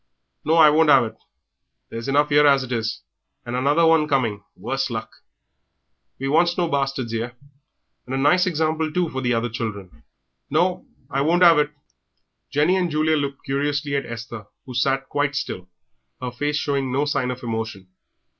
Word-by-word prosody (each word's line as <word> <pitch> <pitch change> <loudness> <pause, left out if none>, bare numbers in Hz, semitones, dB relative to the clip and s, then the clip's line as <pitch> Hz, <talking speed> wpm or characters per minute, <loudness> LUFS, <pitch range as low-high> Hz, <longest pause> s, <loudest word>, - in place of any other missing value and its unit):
Now, 160 - +2
I 155 -2 +7
won't 160 +1 +4
'ave 130 -5 +5
it; - - -32 0.7
there's 115 +2 -6
enough 145 +2 +2
'ere 145 0 +5
as 140 -1 +4
it 130 - -9
is, 115 - -2 0.4
and 120 0 -4
another 145 +6 +3 0.2
coming, 115 -8 0
worse 135 0 -2
luck. 110 -2 -5 1.1
We 135 - -4
wants 170 +4 +2
no 175 -2 +1
bastards 135 -5 -2
'ere.... 120 +2 -3 0.7
And 130 - -3
a - - -1
nice 175 +7 +3
example, 160 -1 0
too, 175 +1 0
for 130 -2 -4
the 125 -2 +1
other 115 +1 0
children! 100 -9 -6 0.5
No, 175 +5 0 0.2
I 135 +1 0
won't 170 +5 +3
'ave 165 -3 +7
it!" 150 0 -2 0.8
Jenny 155 +6 +2
and 180 -2 0
Julia 155 0 +1
looked 140 -2 -3
curiously 145 +1 -1
at 140 - -2
Esther, 115 -2 -8 0.2
who 130 - -9
sat 135 +2 0
quite 145 0 -1
still, 90 -7 -4 0.5
her 125 -1 -4
face 145 +5 -2
showing 140 -3 -1
no 140 +3 +1
sign 135 -3 -1
of 125 0 -6
emotion. 110 -4 -4
135 Hz, 175 wpm, -22 LUFS, 120-150 Hz, 1.1 s, I